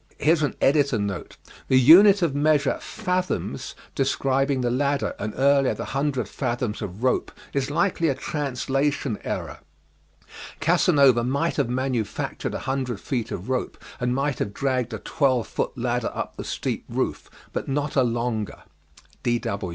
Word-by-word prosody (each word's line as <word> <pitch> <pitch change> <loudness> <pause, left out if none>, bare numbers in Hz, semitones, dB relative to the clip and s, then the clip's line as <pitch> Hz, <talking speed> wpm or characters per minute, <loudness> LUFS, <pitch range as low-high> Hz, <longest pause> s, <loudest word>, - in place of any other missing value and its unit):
[The 140 - +2 0.6
unit 175 +11 +8
of 160 -5 +1
measure: 145 -1 +2
'fathoms' 180 0 -3 0.2
describing 135 0 +1
the 120 -1 0
ladder 140 +2 0
and 105 +1 -3
earlier 140 0 +3
the - - -5
100 135 -5 0
fathoms 120 0 -3
of 105 +2 -6
rope, 130 - +1 0.2
is 140 0 0
likely 165 +2 +1
a 140 - +1
translation 140 -3 -1
error: - - -4 1.0
Casanova 135 -5 +4
might 140 +7 0
have 140 -5 +1
manufactured 125 -4 -2
100 130 -5 -2
feet 120 -1 -3
of 90 - -6
rope 130 -1 -2 0.2
and 125 0 0
might 140 0 -1
have 100 - -3
dragged 130 -3 0
a - - -3
12 130 -6 +1
foot - - -3
ladder 120 -1 -1
up - - -4
the - - -6
steep - - -3
roof, - - -2 0.2
but - - -3
not 145 +1 -1
a 135 - +5
longer. 115 -3 -2
135 Hz, 135 wpm, -24 LUFS, 120-145 Hz, 1.0 s, unit